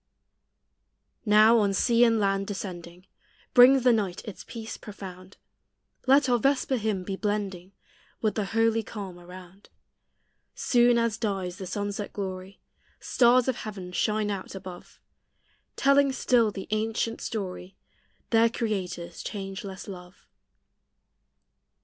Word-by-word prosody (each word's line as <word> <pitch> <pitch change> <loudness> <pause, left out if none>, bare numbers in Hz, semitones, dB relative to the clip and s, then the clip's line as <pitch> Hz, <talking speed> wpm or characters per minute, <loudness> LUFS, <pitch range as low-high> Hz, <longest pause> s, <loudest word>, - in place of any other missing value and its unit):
Now, 215 +2 +6
on 200 -2 +1
sea 235 +3 +3
and 230 -1 +3
land 195 -1 0
descending, 180 -3 -7 0.5
Brings 255 +1 +7
the 250 -1 +5
night 195 -5 -2
its 210 - -8
peace 225 -2 -7
profound: 190 -2 -10 0.7
Let 275 +1 +5
our 245 -1 +2
vesper 270 +1 +1
hymn 210 -4 -2
be 195 +1 -4
blending 195 -3 -3 0.5
With 215 -2 0
the 215 - -2
holy 225 +2 +1
calm 195 -5 -8
around. 180 +2 -13 0.9
Soon 240 -1 +3
as 230 -2 0
dies 190 -5 -2
the 190 - -6
sunset 205 +1 -4
glory, 190 -1 -6 0.4
Stars 245 0 +3
of 260 -2 0
heaven 195 -4 -7
shine 210 +2 0
out 195 -1 -6
above, 185 -2 -10 0.8
Telling 275 0 +4
still 245 -4 +2
the 195 -2 -7
ancient 225 +1 -1
story 190 -3 -5 0.6
Their 230 0 +5
Creator's 195 -7 -4
changeless 195 -1 -6
love. 180 -2 -11
205 Hz, 120 wpm, -27 LUFS, 190-230 Hz, 0.9 s, Brings